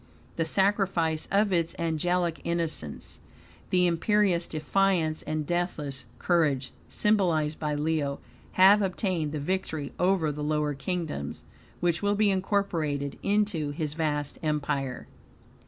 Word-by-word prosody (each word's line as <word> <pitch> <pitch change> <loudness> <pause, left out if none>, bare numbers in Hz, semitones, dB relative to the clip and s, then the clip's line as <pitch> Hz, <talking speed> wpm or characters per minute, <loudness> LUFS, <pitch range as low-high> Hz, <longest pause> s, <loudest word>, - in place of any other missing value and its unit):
The 165 - 0
sacrifice 190 -4 +1
of 200 0 +3
its 170 -1 0
angelic 170 +1 0
innocence, 165 - -3 0.5
the 180 -1 +3
imperious 180 0 +2
defiance 160 0 +1
and 155 -1 -3
deathless 150 -7 -2
courage, 150 -7 +1 0.2
symbolized 170 -8 +1
by 150 -1 -1
Leo, 150 -2 -1 0.3
have 195 +3 +7
obtained 185 -5 -1
the 150 - -3
victory 160 -2 -3
over 180 -4 +2
the 150 0 -5
lower 150 0 0
kingdoms; 150 - -4 0.4
which 170 -1 +1
will 205 0 +2
be 205 -1 +3
incorporated 170 -8 -1
into 200 -7 +1
his 150 0 -3
vast 150 -2 -2
empire. 145 -4 -2
165 Hz, 120 wpm, -28 LUFS, 150-185 Hz, 0.5 s, have